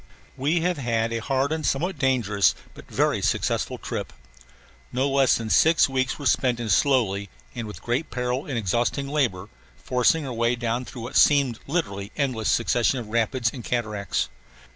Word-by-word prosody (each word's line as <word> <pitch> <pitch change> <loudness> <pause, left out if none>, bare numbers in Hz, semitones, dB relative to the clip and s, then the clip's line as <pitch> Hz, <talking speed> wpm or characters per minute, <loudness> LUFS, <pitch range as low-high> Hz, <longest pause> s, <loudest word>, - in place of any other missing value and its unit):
We 150 +6 +1
have 180 -2 0
had 115 -2 0
a 115 - -1
hard 135 +4 0
and 160 -1 -2
somewhat 150 +6 -1
dangerous 120 -7 +2 0.2
but - - -14
very - - +1
successful - - 0
trip. - - -5 0.8
No 130 +3 +1
less 135 -1 +3
than 110 -2 -4
six 160 +1 +5
weeks 130 -2 -1
were 145 - -8
spent 125 -1 +2
in 115 -2 -3
slowly 100 -4 +2 0.2
and 115 - -5
with 105 - -9 0.3
peril 125 +2 -2
and 135 -4 -3
exhausting 120 +6 0
labor 125 -10 -1 0.3
forcing 130 +5 +1
our 130 - -4
way 115 +1 +1
down 120 +1 -2
through 120 -2 -8
what 120 - -7
seemed 140 -5 +4
a 140 - -14
literally 100 - -2
endless 125 -7 0
succession 120 +2 +2
of 115 -4 -6
rapids 115 +1 0
and 125 - -8
cataracts. 110 -5 -2
125 Hz, 170 wpm, -24 LUFS, 115-135 Hz, 0.8 s, six